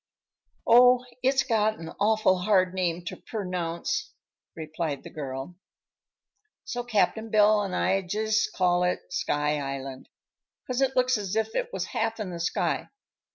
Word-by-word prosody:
"Oh, 250 Hz, +1 st, +6 dB, 0.2 s
it's 265 Hz, +1 st, +3 dB
got 220 Hz, -3 st, +1 dB
an 165 Hz, -, -8 dB
awful 210 Hz, -3 st, +3 dB
hard 185 Hz, -1 st, +2 dB
name 175 Hz, -2 st, -1 dB
to -, -, -5 dB
pernounce," 180 Hz, -5 st, -3 dB, 0.5 s
replied 155 Hz, -2 st, -4 dB
the -, -, -10 dB
girl, 135 Hz, +3 st, -6 dB, 1.1 s
"so 245 Hz, -1 st, -4 dB
Cap'n 220 Hz, -1 st, 0 dB
Bill 210 Hz, 0 st, +5 dB
and 195 Hz, -3 st, -3 dB
I 195 Hz, 0 st, +2 dB
jus' 215 Hz, +4 st, 0 dB
call 180 Hz, -1 st, +1 dB
it 180 Hz, 0 st, 0 dB
'Sky 150 Hz, -1 st, 0 dB
Island,' 135 Hz, -1 st, -6 dB, 0.6 s
'cause 255 Hz, +1 st, -2 dB
it 265 Hz, -1 st, +1 dB
looks 255 Hz, -2 st, +3 dB
as 200 Hz, -1 st, -4 dB
if 220 Hz, 0 st, 0 dB
it -, -, -2 dB
was -, -, -3 dB
half 225 Hz, 0 st, -1 dB
in 200 Hz, -4 st, -4 dB
the 170 Hz, -, -6 dB
sky. 170 Hz, -, -1 dB
195 Hz, 150 wpm, -27 LUFS, 170-220 Hz, 1.1 s, Oh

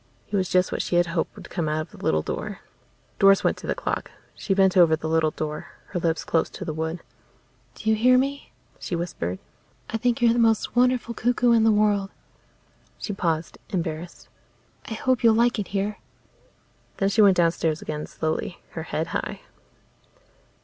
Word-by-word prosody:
He -, -, -4 dB
was 185 Hz, -2 st, 0 dB
just 185 Hz, 0 st, +2 dB
what -, -, -1 dB
she -, -, -2 dB
had 175 Hz, 0 st, +4 dB
hoped 165 Hz, -, -1 dB
would -, -, -12 dB
come 165 Hz, -4 st, -1 dB
out 155 Hz, +1 st, 0 dB
of 155 Hz, -, -9 dB
the -, -, -13 dB
little 80 Hz, 0 st, +2 dB
door. -, -, -5 dB, 0.6 s
Doris 195 Hz, 0 st, +6 dB
went -, -, +2 dB
to -, -, -9 dB
the -, -, 0 dB
clock. -, -, -3 dB, 0.2 s
She 195 Hz, -, -2 dB
bent 190 Hz, -2 st, +4 dB
over 170 Hz, -3 st, +6 dB
the 160 Hz, -, -5 dB
little 160 Hz, -1 st, +2 dB
door, 155 Hz, 0 st, -5 dB, 0.2 s
her 180 Hz, -, -2 dB
lips 165 Hz, -1 st, 0 dB
close 165 Hz, -, +1 dB
to 190 Hz, -, -8 dB
the 160 Hz, -, -3 dB
wood. 160 Hz, +2 st, -4 dB, 0.7 s
"Do -, -, -9 dB
you 220 Hz, -, +5 dB
hear 250 Hz, +4 st, +5 dB
me?" 275 Hz, +2 st, -2 dB, 0.3 s
she 175 Hz, -, -3 dB
whispered. 95 Hz, -, -3 dB, 0.5 s
"I 225 Hz, -, 0 dB
think 240 Hz, +1 st, 0 dB
you're 235 Hz, -1 st, +4 dB
the 240 Hz, -, 0 dB
most 225 Hz, -1 st, +2 dB
wonderful 250 Hz, -1 st, +2 dB
cuckoo 245 Hz, +1 st, +2 dB
in 230 Hz, -1 st, +5 dB
the 225 Hz, -, +5 dB
world." 205 Hz, -2 st, +2 dB, 0.9 s
She 210 Hz, -, -4 dB
paused, 165 Hz, -3 st, -2 dB
embarrassed. 170 Hz, -1 st, -4 dB, 0.6 s
"I 220 Hz, -, -3 dB
hope 255 Hz, +2 st, 0 dB
you'll 225 Hz, -1 st, +6 dB
like 235 Hz, 0 st, +3 dB
it 205 Hz, -, -3 dB
here." 200 Hz, +1 st, -2 dB, 1.0 s
Then 195 Hz, -, +2 dB
she 215 Hz, +2 st, +3 dB
went 195 Hz, -3 st, +6 dB
downstairs 165 Hz, -2 st, +1 dB
again, 150 Hz, 0 st, -4 dB
slowly, 160 Hz, +2 st, -3 dB
her 160 Hz, -, -5 dB
head 160 Hz, -, -1 dB
high. -, -, -3 dB
190 Hz, 190 wpm, -25 LUFS, 160-225 Hz, 1.0 s, Doris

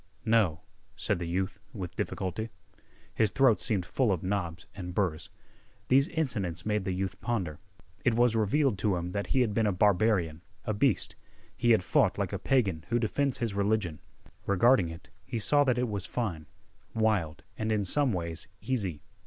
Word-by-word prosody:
"No," 105 Hz, -8 st, +3 dB, 0.3 s
said 105 Hz, -4 st, -1 dB
the 85 Hz, -, -3 dB
youth 95 Hz, +3 st, -2 dB
with 95 Hz, -5 st, -6 dB
difficulty. 105 Hz, +4 st, -3 dB, 0.6 s
His 110 Hz, -, +3 dB
throat 125 Hz, +1 st, +4 dB
seemed 100 Hz, -8 st, +1 dB
full 120 Hz, +5 st, +1 dB
of 90 Hz, -4 st, -1 dB
knobs 90 Hz, -4 st, -2 dB
and 90 Hz, -2 st, -7 dB
burrs. 85 Hz, -6 st, -1 dB, 0.6 s
These 135 Hz, +2 st, +5 dB
incidents 100 Hz, -, -2 dB
made 105 Hz, -2 st, 0 dB
the 95 Hz, -, -1 dB
youth 95 Hz, +1 st, -3 dB
ponder. 95 Hz, -11 st, -2 dB, 0.4 s
It 120 Hz, -, +3 dB
was 120 Hz, -1 st, +3 dB
revealed 115 Hz, +1 st, +2 dB
to 100 Hz, 0 st, +2 dB
him 90 Hz, 0 st, -3 dB
that 100 Hz, +1 st, -2 dB
he 130 Hz, -, +2 dB
had 115 Hz, -4 st, +1 dB
been 110 Hz, 0 st, +2 dB
a -, -, +3 dB
barbarian, 90 Hz, -4 st, +2 dB, 0.2 s
a 110 Hz, -, 0 dB
beast. 125 Hz, +6 st, +1 dB, 0.4 s
He 120 Hz, -, +1 dB
had 110 Hz, -6 st, +5 dB
fought -, -, +2 dB
like -, -, -2 dB
a -, -, -2 dB
pagan 100 Hz, -12 st, +1 dB
who 120 Hz, -, +2 dB
defends 130 Hz, +4 st, 0 dB
his 115 Hz, -4 st, -2 dB
religion. 100 Hz, -6 st, 0 dB, 0.5 s
Regarding 100 Hz, -1 st, +4 dB
it, 85 Hz, +2 st, -10 dB, 0.2 s
he 115 Hz, -, -4 dB
saw 145 Hz, +6 st, +4 dB
that 125 Hz, -2 st, +2 dB
it 125 Hz, 0 st, +1 dB
was 100 Hz, -4 st, -3 dB
fine, 90 Hz, -11 st, -3 dB, 0.5 s
wild, 100 Hz, -7 st, +1 dB
and, 110 Hz, 0 st, -2 dB
in 105 Hz, -2 st, +1 dB
some 140 Hz, +7 st, +2 dB
ways, 85 Hz, -2 st, -3 dB
easy. 100 Hz, -, -2 dB
100 Hz, 180 wpm, -29 LUFS, 90-115 Hz, 0.6 s, These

